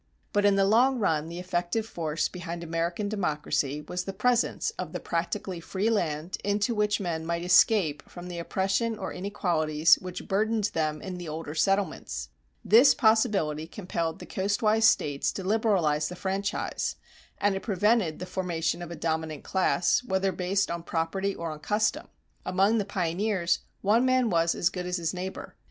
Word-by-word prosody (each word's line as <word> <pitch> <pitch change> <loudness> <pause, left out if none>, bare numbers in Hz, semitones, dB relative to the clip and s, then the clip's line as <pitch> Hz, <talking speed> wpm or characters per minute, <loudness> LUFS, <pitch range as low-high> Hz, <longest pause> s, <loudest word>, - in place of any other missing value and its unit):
But 205 0 +2
in 200 -1 +5
the 195 0 +3
long 245 +6 +4
run 160 -8 0
the 170 - -7
effective 180 +4 -1
force 165 -6 -2
behind 175 -1 -6
American 170 +4 -2
democracy 150 -7 -1
was 180 +4 -4
the 195 - -4
presence 240 - +1
of - - -5
the - - -3
practically 175 +2 -3
free 195 +6 -1
land 165 -4 -1
into 205 +3 +1
which 210 -1 +1
men 170 -4 -2
might 170 +1 -2
escape 180 -4 +3
from 180 0 -9
oppression 195 +6 -1
or 190 - -5
inequalities 165 -5 +2
which 185 -1 -7
burdened 215 +1 +1
them 155 -1 -1
in 185 -2 -5
the 175 -3 -6
older 155 -1 -5
settlements. 160 - -1 0.4
This 240 +6 +7
possibility 205 - +2
compelled 170 -3 -3
the - - -10
coastwise 210 +3 +1
States 145 - +2
to 190 - -5
liberalize 185 -8 +1
the 180 - -7
franchise; 195 +3 -2 0.4
and 205 0 +2
it 195 - -3
prevented 205 -4 +1
the 180 - -5
formation 175 -3 -2
of 175 - -6
a 170 - -6
dominant 160 -3 -3
class, 185 +3 +2
whether 190 -3 0
based 190 +2 0
on 170 0 -3
property 175 +4 -2
or 165 -1 -4
on 155 - -8
custom. 215 +6 0 0.4
Among 195 +5 +2
the 205 - -1
pioneers 185 -1 0 0.2
one 215 +5 +4
man 255 -3 +2
was 165 -1 +2
as 175 - +2
good 180 -1 -4
as 180 +1 -1
his 165 -2 -2
neighbor. 185 +1 -6
185 Hz, 170 wpm, -27 LUFS, 165-205 Hz, 0.4 s, This